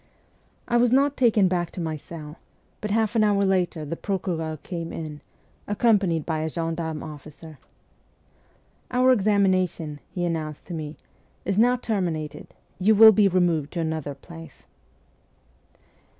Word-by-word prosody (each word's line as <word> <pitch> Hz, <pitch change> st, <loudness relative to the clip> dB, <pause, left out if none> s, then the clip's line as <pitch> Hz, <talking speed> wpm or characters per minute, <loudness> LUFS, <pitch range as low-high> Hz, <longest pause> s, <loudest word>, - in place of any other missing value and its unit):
I 240 Hz, -, +2 dB
was 240 Hz, 0 st, +3 dB
not 275 Hz, +2 st, +3 dB
taken 220 Hz, -6 st, +4 dB
back 175 Hz, -2 st, -1 dB
to -, -, -7 dB
my 160 Hz, -2 st, -2 dB
cell, 155 Hz, 0 st, -10 dB, 0.4 s
but 210 Hz, -, -3 dB
an 220 Hz, +1 st, +2 dB
hour 200 Hz, -1 st, +3 dB
later 180 Hz, -4 st, 0 dB
the 150 Hz, -, -4 dB
procureur 170 Hz, -5 st, -3 dB
came 170 Hz, -2 st, -5 dB
in, 155 Hz, -2 st, -7 dB, 0.5 s
accompanied 200 Hz, -7 st, +2 dB
by 160 Hz, -2 st, -1 dB
a 160 Hz, +1 st, -2 dB
gendarme 165 Hz, -1 st, -3 dB
officer. 155 Hz, 0 st, -11 dB, 0.7 s
' -, -, -37 dB, 0.5 s
Our 255 Hz, +1 st, +4 dB
examination,' 190 Hz, -8 st, +1 dB
he 175 Hz, -1 st, -3 dB
announced 155 Hz, -3 st, -4 dB
to 175 Hz, -, -8 dB
me, 155 Hz, -2 st, -6 dB, 0.2 s
' -, -, -38 dB
is 195 Hz, +2 st, 0 dB
now 245 Hz, +2 st, +5 dB
terminated; 180 Hz, -10 st, -3 dB, 0.3 s
you 210 Hz, +4 st, +4 dB
will 220 Hz, +1 st, +10 dB
be 210 Hz, -1 st, +4 dB
removed 175 Hz, -5 st, +1 dB
to 175 Hz, -, -3 dB
another 160 Hz, -3 st, -3 dB
place.' 165 Hz, 0 st, -13 dB
175 Hz, 145 wpm, -25 LUFS, 160-205 Hz, 0.7 s, will